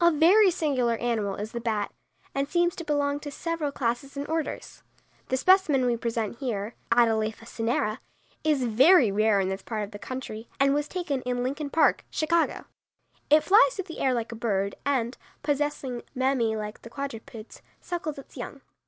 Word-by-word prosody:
A 340 - +8
very 350 +6 +6
singular 270 -9 +1
animal 220 -5 -1
is 210 +2 -5
the 235 - -4
bat, 215 -3 -1 0.4
and 275 +1 -1
seems 345 -1 +2
to 335 - -6
belong 290 -2 0
to 290 - -7
several 330 0 -3
classes 265 +2 -2
and 280 - -3
orders. 320 -1 -4 0.5
The 260 - 0
specimen 315 -6 +4
we 240 -1 +2
present 230 -1 -3
here 225 -5 -3 0.2
(Atalapha 225 -1 +2
cinerea) 225 -2 -1 0.4
is 300 -4 +2
very 250 - +6
rare 215 0 +3
in 190 -1 0
this 190 0 -3
part 215 +1 -3
of 205 - -7
the 205 - -8
country, 240 -3 -6
and 275 0 +4
was 295 +1 0
taken 310 -7 -2
in 245 0 -2
Lincoln 285 +3 -3
Park, 320 - +3
Chicago. 330 +1 0 0.6
It 305 +1 +6
flies 440 +6 +5
through 385 - -3
the 330 - -8
air 260 -2 +2
like 235 -1 -3
a - - -6
bird 200 -3 -1
and, 255 -3 0 0.2
possessing 290 -4 -1 0.2
mammæ 255 -4 +1
like 210 0 -6
the 230 - -11
quadrupeds, 235 -4 -7 0.2
suckles 330 -4 -4
its 275 - -12
young. - - -7
260 Hz, 180 wpm, -27 LUFS, 225-295 Hz, 0.6 s, A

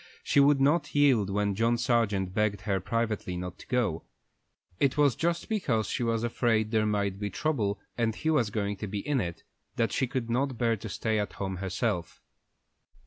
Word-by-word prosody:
She - - +3
would 140 0 +5
not 150 +2 +2
yield 130 -9 +4
when 100 0 0
John 115 +4 +2
Sargent 115 -6 +1
begged 105 -1 0
her 100 -3 0
privately 110 -3 -2
not 90 0 -6
to - - -13
go. 110 -11 0 0.8
It 140 0 +2
was 145 -5 +4
just 170 +1 -1
because 135 - 0
she - - -3
was 115 -1 0
afraid 115 -2 +1
there 110 -2 +2
might 100 -2 -1
be 105 -1 -2
trouble, 105 - -1 0.2
and 115 -2 +1
he 160 - 0
was 125 -9 +2
going 105 -1 -2
to 105 - -5
be 100 0 -4
in 140 -4 +2
it, 85 -3 -5 0.3
that 115 -3 +1
she 130 - 0
could 125 -2 -3
not 130 +2 0
bear 115 -1 +2
to 110 +1 -8
stay 110 +2 -1
at 105 - -3
home 95 -1 -4
herself. 90 -2 -2
110 Hz, 195 wpm, -28 LUFS, 100-130 Hz, 0.8 s, would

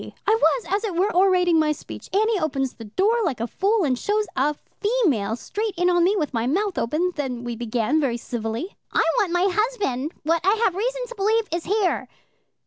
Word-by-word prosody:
I 435 - +4
was, 460 +1 +2
as 400 +3 0
it 405 -6 -2
were, 385 +5 +1
orating 360 -3 +4
my 310 -1 +2
speech. 300 - -8
Annie 430 +1 +2
opens 275 -5 -1
the 225 - -10
door 395 - +1
like 310 - -1
a 230 - -1
fool, 395 - +1
and 255 -5 0
shows 425 +1 0
a 290 +3 +1 0.2
female 355 - +1
straight 415 - -4
in 355 +1 +3
on 350 -1 +3
me, 385 +4 +3
with 300 -6 -2
my 230 0 0
mouth 385 +7 0
open. 320 +9 0
Then 260 -6 -4
we 240 -1 -4
began 240 +5 0
very 250 -5 0
civilly. 235 - -4 0.2
'I - - +3 0.2
want 400 -5 +1
my 355 +2 +2
husband, 390 - -1
what 330 +2 +1
I 390 +4 +4
have 380 - +3
reason - - -2
to 485 - -9
believe 435 +3 +2
is 340 0 -2
here.' 400 -1 0
350 Hz, 210 wpm, -23 LUFS, 270-415 Hz, 0.2 s, I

